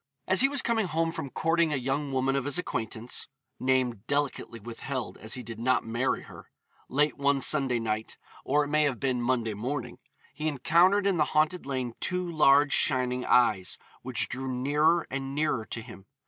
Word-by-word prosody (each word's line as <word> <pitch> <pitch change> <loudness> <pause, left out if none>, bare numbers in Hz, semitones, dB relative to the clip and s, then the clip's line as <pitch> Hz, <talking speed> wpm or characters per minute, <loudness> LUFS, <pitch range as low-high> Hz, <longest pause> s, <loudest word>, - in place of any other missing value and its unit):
As 190 +3 +5
he 270 - +5
was 280 -2 0
coming 225 -4 +1
home 165 0 0
from 140 -4 -5
courting 165 +3 +1
a - - +1
young 135 +2 -2
woman 135 +1 +1
of 135 -2 -1
his 145 -1 +1
acquaintance 115 -8 -3 0.3
(name 130 -4 +1
delicately 140 -5 -2
withheld, 120 +3 -5
as 110 0 -4
he 125 - -7
did 115 -1 -8
not 130 +2 +1
marry 115 +3 -1
her) - - -13 0.4
late 145 +2 +1
one 140 0 +2
Sunday 135 -3 +4
night 110 -1 -3 0.3
or 145 +2 +2
it 145 - -5
may 150 +1 +2
have 140 -5 0
been 130 -3 0
Monday 120 -3 0
morning 125 +4 -4 0.3
he 155 +2 -3
encountered 170 +8 +3
in 195 -3 +2
the 155 - +4
haunted 155 +1 +1
lane 130 -3 -3
two 180 -1 -1
large 145 -3 +4
shining 125 -2 +1
eyes, 105 -7 +3 0.2
which 120 -3 0
drew 130 0 -4
nearer 150 +6 +2
and 135 0 -4
nearer 145 -7 0
to 115 - -6
him. 100 -5 -13
135 Hz, 185 wpm, -28 LUFS, 125-150 Hz, 0.4 s, As